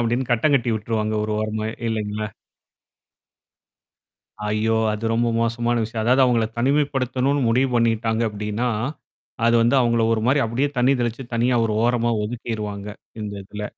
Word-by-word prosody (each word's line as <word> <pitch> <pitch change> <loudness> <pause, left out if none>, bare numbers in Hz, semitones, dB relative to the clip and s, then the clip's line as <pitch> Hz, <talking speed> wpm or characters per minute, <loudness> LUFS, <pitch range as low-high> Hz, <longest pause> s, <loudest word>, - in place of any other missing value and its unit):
அப்படின்னு 120 +2 0
கட்டங்கட்டி 125 0 +2
விட்டுருவாங்க 110 0 -2
1 110 - -2
ஓரமாவே 110 0 -2 0.2
இல்லைங்களா? 105 -1 -2 2.2
ஐயோ! 110 +1 +1 0.2
அது 105 +2 -5
ரொம்ப 120 +1 +1
மோசமான 120 +1 0
விஷயம். 110 0 -3
அதாவது 130 +3 +4
அவங்கள 120 -3 +2
தனிமைப்படுத்தணும்னு 135 0 +1
முடிவு 130 +3 +2
பண்ணிட்டாங்க 115 0 +1
அப்டின்னா 105 +3 -2 0.8
அது 115 0 +4
வந்து 120 +4 +3
அவுங்கள 115 -2 +2
ஒரு 110 - +1
மாரி 140 +2 +3
அப்படியே 130 +6 0
தண்ணி 130 +3 +4
தெளிச்சு 120 +1 -2
தனியா 120 +2 +2
ஒரு 110 - -2
ஓரமா 120 -1 +2
ஒதுக்கிருவாங்க 105 -3 -5 0.3
இந்த 105 -1 -5
இதுல. 105 +2 -7
115 Hz, 135 wpm, -22 LUFS, 110-125 Hz, 2.2 s, அதாவது